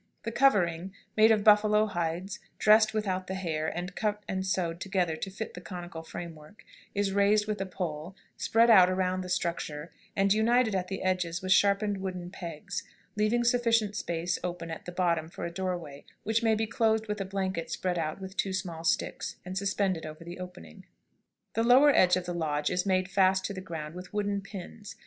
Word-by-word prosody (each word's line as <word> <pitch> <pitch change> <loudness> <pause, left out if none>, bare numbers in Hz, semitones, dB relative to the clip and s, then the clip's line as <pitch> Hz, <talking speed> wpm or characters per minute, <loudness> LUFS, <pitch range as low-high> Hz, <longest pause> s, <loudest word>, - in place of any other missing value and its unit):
The 230 - -3
covering, 190 -8 +2 0.2
made 220 +1 +6
of 215 -2 +3
buffalo 210 0 +5
hides, 180 +2 -3 0.2
dressed 215 0 +5
without 190 -4 -2
the 190 - -3
hair, 160 -4 -2
and 175 +3 -4
cut 210 -1 -1
and 190 0 -2
sewed 180 -2 -1
together 185 -5 0
to 195 - -4
fit 210 +3 -6
the 180 - -8
conical 175 -2 -7
frame, 165 0 -8 0.6
is 200 -1 +1
raised 205 +1 +3
with 210 -2 -3
a 195 - -2
pole, 175 -1 -5 0.2
spread 230 +1 +4
out 185 -4 +8
around 185 0 0
the 180 - -7
structure, 170 -3 -2 0.2
and 195 0 +3
united 225 +1 +3
at 185 -1 -1
the 190 0 -4
edges 180 -2 -1
with 185 - -2
sharpened 200 +1 +3
wooden 180 -2 -5
pegs, 175 +2 -6 0.3
leaving 215 +3 +2
sufficient 230 -3 +2
space 170 -3 -2
open 175 -2 -4
at 160 - -7
the 180 - -6
bottom 170 -3 0
for - - -6
a 170 - -4
doorway, 170 -6 -4 0.2
which 220 +2 +1
may 225 -1 +3
be 220 +1 0
closed 220 -1 +1
with 210 -1 -3
a - - +1
blanket 190 -3 -3
spread 180 -2 -1
out 155 +2 -3
with 190 0 -8
two 195 -2 -1
small 170 -4 -4
sticks, 165 - -1
and 185 +1 -6
suspended 190 -3 0
over 155 +1 -8
the 175 +2 -9
opening. 85 - -10 0.7
The 225 - +1
lower 260 +5 +7
edge 180 0 +5
of 180 - -4
the 175 - -3
lodge 150 -3 -1
is 180 +2 0
made 185 -1 +2
fast 190 0 +3
to 200 - -3
the 185 - -6
ground 160 -4 -6
with 180 +1 -9
wooden 205 -1 0
pins. 200 +1 -9
190 Hz, 195 wpm, -29 LUFS, 175-210 Hz, 0.7 s, out